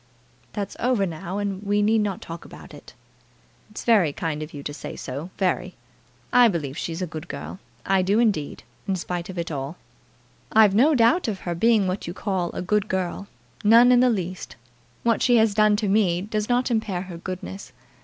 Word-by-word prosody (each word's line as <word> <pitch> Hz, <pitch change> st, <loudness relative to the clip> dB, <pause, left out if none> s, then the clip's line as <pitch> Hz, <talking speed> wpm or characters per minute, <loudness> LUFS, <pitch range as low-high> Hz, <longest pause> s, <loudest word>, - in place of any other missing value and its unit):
"That's 200 Hz, -1 st, -4 dB
over 245 Hz, -5 st, +2 dB
now, 175 Hz, +2 st, -5 dB
and 200 Hz, -2 st, -3 dB
we 205 Hz, 0 st, +1 dB
need 220 Hz, +1 st, +3 dB
not 205 Hz, -2 st, -2 dB
talk 165 Hz, 0 st, -8 dB
about -, -, -13 dB
it." 145 Hz, -4 st, -14 dB, 0.7 s
"It's 215 Hz, -, -8 dB
very 205 Hz, -10 st, +4 dB
kind 155 Hz, 0 st, -3 dB
of 155 Hz, +1 st, -6 dB
you 145 Hz, -1 st, -8 dB
to 145 Hz, -, -5 dB
say 145 Hz, -, -7 dB
so, 140 Hz, +7 st, -6 dB
very. 185 Hz, -1 st, -1 dB, 0.6 s
I 245 Hz, -1 st, +7 dB
believe 155 Hz, -9 st, -2 dB
she's 165 Hz, +2 st, -4 dB
a -, -, 0 dB
good 160 Hz, 0 st, -8 dB
girl. 185 Hz, -, -7 dB, 0.3 s
I 195 Hz, -1 st, +3 dB
do, 195 Hz, +3 st, +2 dB
indeed, 205 Hz, -11 st, 0 dB, 0.2 s
in 195 Hz, -, 0 dB
spite 175 Hz, -1 st, -4 dB
of 185 Hz, -, -7 dB
it 170 Hz, -1 st, -3 dB
all." 140 Hz, +3 st, -5 dB, 0.7 s
"I've 215 Hz, -3 st, +6 dB
no 280 Hz, +9 st, +4 dB
doubt 255 Hz, +7 st, +3 dB
of 205 Hz, -4 st, -3 dB
her 175 Hz, -, -3 dB
being 220 Hz, +3 st, +3 dB
what 185 Hz, 0 st, -3 dB
you 175 Hz, -, -5 dB
call 185 Hz, -5 st, -2 dB
a -, -, -4 dB
good 210 Hz, +3 st, +1 dB
girl, 190 Hz, +1 st, -3 dB, 0.4 s
none 230 Hz, +4 st, +7 dB
in 245 Hz, -, +6 dB
the 250 Hz, 0 st, +5 dB
least. 185 Hz, -5 st, -3 dB, 0.5 s
What 230 Hz, -1 st, +2 dB
she 245 Hz, -, +4 dB
has 220 Hz, -2 st, +4 dB
done 215 Hz, 0 st, +4 dB
to 210 Hz, 0 st, -1 dB
me 190 Hz, -3 st, +2 dB
does 215 Hz, +1 st, -3 dB
not 245 Hz, +1 st, +1 dB
impair 205 Hz, -5 st, -1 dB
her 180 Hz, -3 st, -8 dB
goodness. 185 Hz, +2 st, -7 dB
195 Hz, 200 wpm, -24 LUFS, 175-215 Hz, 0.7 s, I